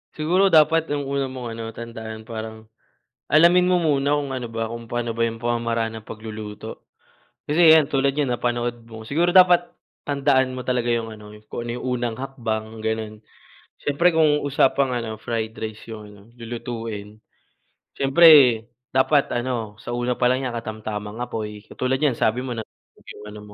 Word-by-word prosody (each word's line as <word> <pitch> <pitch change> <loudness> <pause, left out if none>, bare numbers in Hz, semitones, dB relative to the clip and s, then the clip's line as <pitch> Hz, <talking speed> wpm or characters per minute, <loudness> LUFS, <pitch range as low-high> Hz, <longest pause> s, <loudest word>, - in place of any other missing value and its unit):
Siguro 175 +6 +2
dapat 165 -1 +4
ang 145 -1 -2
una 140 0 -2
mong 130 -2 -7
ano 115 - -5
tandaan 110 -1 -8
parang 110 -1 -8 0.6
alamin 175 +3 +6
mo 180 -1 +3
muna 145 -3 +2
kung 145 -2 -3
ano 130 -2 -4
ba 115 -1 -4
kung 115 0 -7
pano 120 0 -2
ba 115 +1 -1
yung 115 0 -7
pamamaraan 115 -1 -1
ng 110 - -21
pagluluto. 110 -1 -8 0.6
Kasi 160 +2 +6
yan 155 -3 +5
tulad 140 -2 +1
niyan 145 -1 -1
napanood 120 -1 -2
mo 110 -1 -10
siguro 170 +4 +2
dapat 180 -1 +5 0.3
tandaan 135 -2 +2
mo - - -4
talaga 125 -2 0
yung 115 -1 -1
ano 105 -1 -12 0.2
kung 120 +2 -5
yung 120 - -5
unang 120 -3 -2
hakbang, 110 -4 -4
ganon. 110 -1 -3 0.6
Siyempre 155 +5 +2
kung 155 -2 +3
usapang 140 -1 +2
ano, 115 -2 -4
fried 110 -1 -3
rice 110 -1 -6
yung, 105 -1 -9
ano, 105 -1 -15 0.2
lulutuin. 115 -3 -6 0.8
Siyempre 140 +5 +3 0.7
dapat 135 +2 +2
ano 120 -4 -3
sa 120 - -6
una 120 +1 0
pa 125 - +2
lang 130 +2 0
niya 125 - -2
katamtamang 110 -2 -5
apoy. 105 -3 -5
Katulad 130 +3 -2
niyan 145 -6 +2
sabi 110 +3 +1
mo 130 - -4
nasunog 110 - -12
yung 105 - -13
ano 105 0 -9
120 Hz, 165 wpm, -23 LUFS, 110-140 Hz, 0.8 s, alamin